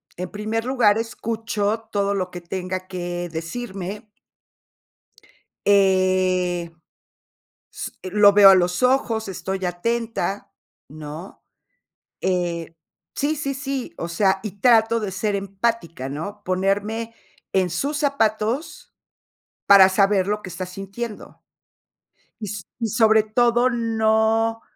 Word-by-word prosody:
En 180 0 -6
primer 215 +2 -2
lugar, 240 -5 +3
escucho 225 -1 -3
todo 200 -1 0
lo 185 -2 -2
que 175 - -7
tenga 185 +1 -5
que 175 -1 -4
decirme. 195 +4 -6 1.6
Eh, 185 -3 +2 1.0
s - - -6
lo 200 +2 +5
veo 200 -1 +9
a 195 - +8
los 180 +4 +1
ojos, 235 -4 +2
estoy 190 +1 -4
atenta, 225 +2 -2 0.4
¿no? 155 +4 -9 0.8
Eh, 170 -3 -2 0.4
sí, 300 +2 0
sí, 280 -2 -3
sí, 270 -2 -4
o 170 - -4
sea, 190 +2 +2
y 205 -2 -7
trato 230 -1 +4
de 205 -3 -4
ser 200 +2 -1
empática, 195 - -2
¿no? 185 +9 -6
Ponerme 205 +5 -1 0.4
en 185 -2 +2
sus 280 - -2
zapatos 265 0 -1 0.7
para 195 -1 +8
saber 195 0 +2
lo 210 +1 -1
que - - -7
está 185 +1 -5
sintiendo. 195 +4 -7 1.0
Y 210 - -4
so 205 -1 -6 0.2
y 230 - -1
sobre 220 0 +4
todo, 240 +3 +2
no 225 -1 +1
205 Hz, 115 wpm, -22 LUFS, 185-225 Hz, 1.6 s, veo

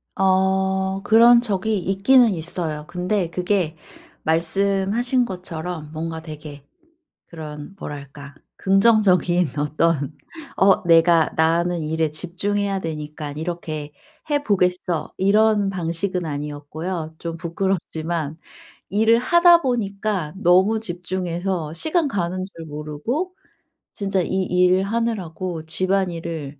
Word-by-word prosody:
어. 190 0 +1
그런 235 +3 +7
적이 215 -1 -1
있기는 200 +7 +4
있어요. 160 -2 -4
근데 180 0 -1
그게 180 -2 -1 0.5
말씀하신 195 +9 +1
것처럼 175 -5 -6
뭔가 160 +1 -4
되게 150 -3 -9 0.6
그런 155 +1 -9
뭐랄까. 140 0 -9 0.2
긍정적인 190 -4 +3
어떤 150 0 0 0.4
'어 195 +2 +4
내가 165 -1 +5
나는 170 +2 +2
일에 160 0 -1
집중해야 195 +5 -2
되니깐 150 -3 -6
이렇게 155 -2 -5 0.4
해 290 -1 +1
보겠어.' 180 - 0
이런 205 +1 +3
방식은 180 0 -2
아니었고요. 155 +3 -5
좀 165 -1 -5
부끄럽지만 170 -3 -2 0.5
일을 225 +3 +4
하다 345 +6 +6
보니까 200 - -2
너무 190 +4 +4
집중해서 175 -3 -3
시간 315 - 0
가는 185 -3 -2
줄 165 - -8
모르고 150 - -4 0.6
진짜 195 -2 -1
이 190 +2 -1
일을 180 +1 +3
하느라고 185 -6 -3
집안일을 165 -4 -2
180 Hz, 245 characters per minute, -22 LUFS, 160-195 Hz, 0.6 s, 그런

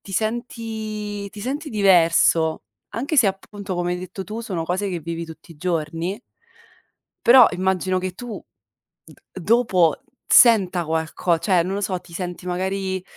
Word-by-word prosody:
ti 195 - -12
senti 215 -2 -4
ti 205 - -10
senti 285 +7 -4
diverso, 170 -5 +3 0.3
anche 270 +9 -3
se 240 - +6
appunto 195 0 -4
come 175 0 -1
hai 180 - -3
detto 185 +1 -7
tu, 215 +3 -6
sono 185 -8 -4
cose 185 +4 -2
che 175 -3 -4
vivi 165 +1 -5
tutti 160 +1 -13
i 155 - -19
giorni 165 +2 -2 1.1
però 245 0 +8
immagino 185 0 0
che 185 0 -3
tu, 235 +2 -8 0.6
d - - -15 0.3
dopo 185 - +2 0.3
senta 190 -7 +5
qualco 160 +2 0
cioè, 175 0 +2
non 185 +3 -3
lo 205 - -3
so, 185 -2 -2
ti 175 - -17
senti 180 0 -6
magari 190 +1 -2
190 Hz, 155 wpm, -22 LUFS, 175-210 Hz, 1.1 s, però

